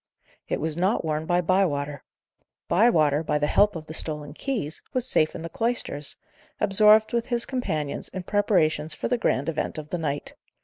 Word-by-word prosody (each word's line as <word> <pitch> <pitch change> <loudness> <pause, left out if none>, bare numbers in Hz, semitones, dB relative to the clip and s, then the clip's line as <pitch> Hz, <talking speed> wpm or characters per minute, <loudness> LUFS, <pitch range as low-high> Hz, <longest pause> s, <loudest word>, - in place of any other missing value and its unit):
It - - -1
was 155 -1 -2
not 185 +2 +1
worn 155 0 -2
by 175 0 +2
Bywater. 150 -6 0 0.6
Bywater, 160 -9 +3
by 150 - 0
the 150 - +1
help 205 +6 +3
of 160 -1 -6
the 155 - -8
stolen 150 -2 -2
keys, 205 - -3
was 255 -1 0
safe 155 -10 +1
in 165 - -6
the - - -4
cloisters, 195 - -1 0.4
absorbed 215 +2 +5
with 235 -1 0
his 240 -1 -1
companions 160 - -3
in 185 -1 -6
preparations 165 -6 +1
for - - -3
the 245 0 0
grand 140 -9 0
event 165 - -2
of 155 -1 -7
the 175 - -3
night. 145 -3 -3
165 Hz, 180 wpm, -25 LUFS, 150-210 Hz, 0.6 s, absorbed